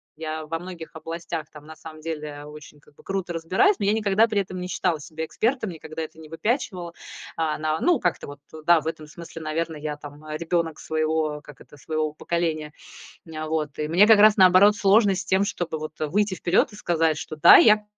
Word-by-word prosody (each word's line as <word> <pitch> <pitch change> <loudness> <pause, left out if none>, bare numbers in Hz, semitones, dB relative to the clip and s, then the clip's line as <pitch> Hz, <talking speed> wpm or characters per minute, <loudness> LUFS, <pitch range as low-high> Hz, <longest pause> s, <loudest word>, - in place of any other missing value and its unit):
Я 155 0 -5
во 165 +1 -2
многих 170 -2 -10
областях 165 0 -5
там 150 0 -13
на 160 - -10
самом 155 0 -12
деле 150 -2 -6
очень 150 0 -13
как 145 - -25
бы - - -19
круто 190 -3 -3
разбираюсь, 185 - +2
но 200 - -2
я 205 - +3
никогда 215 0 +3
при 210 -3 0
этом 185 -1 -7
не 180 - -5
считала 175 -4 -1
себя 160 +2 -6
экспертом, 225 - -1
никогда 160 -1 -7
это 160 0 -7
не 160 - -12
выпячивала. 180 - -3 0.4
А 155 -2 -1
на 155 0 -1
ну, 345 -6 +3
как-то 175 - -1
вот, 145 -1 -10 0.3
да, 170 -1 +6
в 160 - -7
этом 160 -1 -5
смысле, 165 +1 -10
наверно, 160 +1 -3
я 150 0 -4
там 145 0 -12
ребёнок 165 0 -2
своего, 155 -1 -1
как 145 -3 -14
это, 145 - -16
своего 155 +1 -3
поколения. 155 -2 -2 0.5
М, 155 -1 -6
вот, 155 -2 -3
и 150 - -1
мне 180 +6 +5
как 220 -2 +6
раз 210 0 +6
наоборот 190 +2 +6
сложно 200 0 +4
с 190 +2 -4
тем, 190 +1 +2
чтобы 165 -5 -4
вот 155 0 -6
выйти 190 +6 0
вперёд 175 +5 +1
и - - -10
сказать, 165 -5 0
что: 155 - -7
"Да, - - +9
я 215 -1 +5
160 Hz, 210 wpm, -24 LUFS, 155-185 Hz, 0.5 s, Да